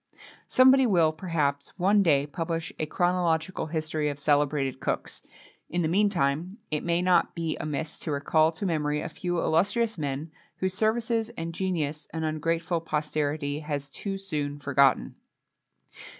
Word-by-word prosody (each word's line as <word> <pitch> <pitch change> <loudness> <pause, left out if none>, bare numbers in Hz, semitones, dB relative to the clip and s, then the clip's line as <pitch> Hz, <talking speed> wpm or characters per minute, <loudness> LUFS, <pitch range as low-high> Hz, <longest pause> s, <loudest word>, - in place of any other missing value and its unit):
Somebody 260 0 +6
will, 170 -7 +4
perhaps, 155 -5 -2
one 200 +3 +4
day 145 -6 +3
publish 165 +2 -4
a 155 - -1
chronological 175 -1 0
history 155 -1 -1
of 145 - -4
celebrated 145 -2 +1
cooks. - - -3 0.5
In 175 0 0
the - - +1
meantime, 180 -2 +1
it 150 - -1
may 170 +1 +1
not 180 -2 +3
be 165 -2 -2
amiss 155 +1 -4
to 155 - -4
recall 155 +3 +3
to 160 - -5
memory 150 -4 0
a 170 - -4
few 175 +2 -3
illustrious 205 +6 +1
men, 145 +2 -3 0.3
whose 190 0 -1
services 225 +2 0
and 165 0 -4
genius 160 -5 -2
an 160 -1 -3
ungrateful 165 +2 -1
posterity 150 -2 -1
has 145 -2 -4
too 195 +7 -4
soon 150 -7 -3
forgotten. 140 -1 +2
160 Hz, 145 wpm, -27 LUFS, 150-180 Hz, 0.5 s, Somebody